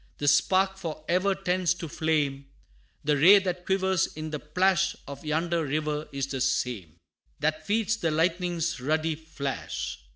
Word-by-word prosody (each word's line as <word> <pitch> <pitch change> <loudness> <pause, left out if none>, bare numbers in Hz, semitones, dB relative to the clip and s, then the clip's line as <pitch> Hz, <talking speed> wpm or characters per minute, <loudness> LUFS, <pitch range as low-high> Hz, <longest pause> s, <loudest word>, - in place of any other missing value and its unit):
The 145 - -3
spark 190 +7 +3
for 155 -4 -6
ever 190 +3 +2
tends 180 -1 0
to 170 -2 -6
flame; 145 -3 -1 0.6
The 150 0 +2
ray 180 +9 +8
that 180 -2 -2
quivers 190 -2 +2
in 155 0 -5
the 150 - -3
plash 185 +5 +1
Of 140 0 -8
yonder 165 +2 0
river, 150 +1 -2
is 140 -1 -2
the 135 -1 -4
same 105 - -1 0.4
That 155 +1 -1
feeds 220 0 +1
the 170 -7 0
lightning's 170 0 0
ruddy 155 +4 0
flash. 150 - -5
160 Hz, 155 wpm, -27 LUFS, 150-180 Hz, 0.6 s, ray